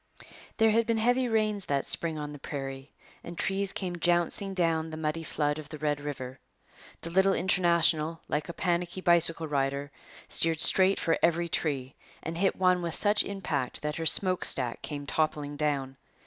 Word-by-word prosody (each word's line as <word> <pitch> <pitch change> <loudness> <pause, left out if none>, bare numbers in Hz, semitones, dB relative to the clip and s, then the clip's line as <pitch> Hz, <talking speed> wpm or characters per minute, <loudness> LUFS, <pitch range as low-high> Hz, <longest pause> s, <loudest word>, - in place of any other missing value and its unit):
There 225 -1 +4
had 230 +1 +1
been 230 -1 +1
heavy 245 +3 +1
rains 215 -3 0
that 140 -1 -2
spring 165 -2 +2
on 150 -1 -6
the 145 - -10
prairie, 135 -1 -7 0.3
and 170 0 -9
trees 195 0 0
came 180 -2 -5
jouncing 175 +3 0
down 165 -3 0
the 155 - -7
muddy 160 +1 -3
flood 150 -1 -2
of 150 -1 -10
the 155 - -8
Red 145 -1 -2
River. 135 -3 -7 0.6
The 170 - -7
little 190 +2 +3
International, 170 -3 +2
like 150 +1 -3
a - - -5
panicky 175 +1 -2
bicycle 170 -2 +5
rider, 140 0 -2 0.4
steered 165 -1 +1
straight 190 +3 +5
for 165 - 0
every 170 0 +1
tree, 135 -5 -2 0.3
and 165 - -5
hit 190 +3 0
one 185 -1 +2
with 170 -2 -3
such 210 0 +2
impact 155 -12 -4
that 150 0 -3
her 165 -1 -1
smokestack 155 -10 +3
came 145 -2 -6
toppling 150 -1 -2
down. 140 -3 -2
165 Hz, 175 wpm, -28 LUFS, 145-185 Hz, 0.6 s, bicycle